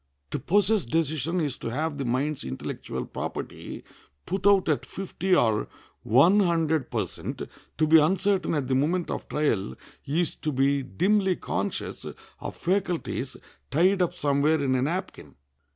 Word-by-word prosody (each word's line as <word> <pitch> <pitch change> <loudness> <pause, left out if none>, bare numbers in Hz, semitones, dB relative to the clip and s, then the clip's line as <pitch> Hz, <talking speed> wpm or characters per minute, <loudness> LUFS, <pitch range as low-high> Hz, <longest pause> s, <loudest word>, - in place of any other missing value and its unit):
To - - -2
possess 200 - +2
decision 160 +4 0
is 145 -6 -1
to - - -4
have 145 +4 -2
the 135 - -2
mind's 135 +4 -1
intellectual 65 0 -5
property - - -6 0.4
put 190 +1 0
out 200 -2 +5
at 155 -3 +1
fifty 190 -1 -1
or 110 -8 +2 0.3
one 165 - +5
hundred 160 -7 +1
per - - 0
cent; - - -6 0.3
to 155 - +3
be 160 +1 +7
uncertain 190 +3 +2
at 140 -4 -1
the 130 - 0
moment 160 +7 +1
of - - -5
trial 105 - 0 0.3
is 160 +4 0
to 155 - -2
be 140 +1 +2
dimly 190 +7 +1
conscious - - -3 0.4
of - - -6
faculties 175 -8 -1 0.3
tied 185 +6 +3
up 175 - +1
somewhere 145 +1 +2
in 130 -1 +1
a 130 - +2
napkin. 150 - -4
155 Hz, 150 wpm, -26 LUFS, 135-185 Hz, 0.4 s, be